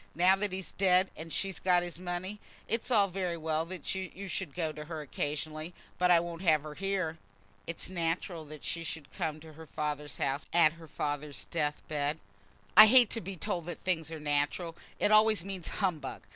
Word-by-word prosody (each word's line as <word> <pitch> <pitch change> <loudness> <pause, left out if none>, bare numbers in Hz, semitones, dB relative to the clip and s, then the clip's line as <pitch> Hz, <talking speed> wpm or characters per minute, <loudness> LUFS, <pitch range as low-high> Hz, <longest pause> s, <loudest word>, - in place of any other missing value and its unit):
Now 180 +3 +5
that 205 0 -1
he's 190 0 -5
dead, 185 -1 +3
and 165 +1 -8
she's 195 +2 -1
got 180 -1 +3
his 175 -1 -7
money, 185 +3 -4 0.3
it's 230 +3 -1
all 210 -5 +5
very 180 -2 -2
well 160 0 0
that 180 -4 -3
you 190 +1 -5
should 185 -5 -4
go 165 -3 -1
to 150 0 -8
her 160 -1 -5
occasionally; 155 +3 -4 0.2
but 180 0 +4
I 175 -1 +7
won't 170 0 -5
have 155 -5 +4
her 155 -1 -7
here." 185 -3 -2 0.5
"It's 170 - -4
natural 170 -1 -2
that 150 -1 -9
she 170 - -2
should 160 -3 -6
come 155 -1 -2
to 160 0 -12
her 160 +1 -11
father's 150 -1 -3
house 140 +1 -1
at 165 -2 +6
her 165 -1 -13
father's 145 -1 -4
death 150 -3 -1
bed." 150 0 -1 0.6
"I 215 +3 +12
hate 245 -1 +7
to 230 - -2
be 190 +2 -6
told 180 -1 -3
that 175 - -6
things 165 -4 -1
are 160 - -5
natural. 150 +3 0 0.2
It 205 - +3
always 215 -4 +5
means 190 -4 -5
humbug. 165 -9 -2
170 Hz, 200 wpm, -31 LUFS, 155-185 Hz, 0.6 s, I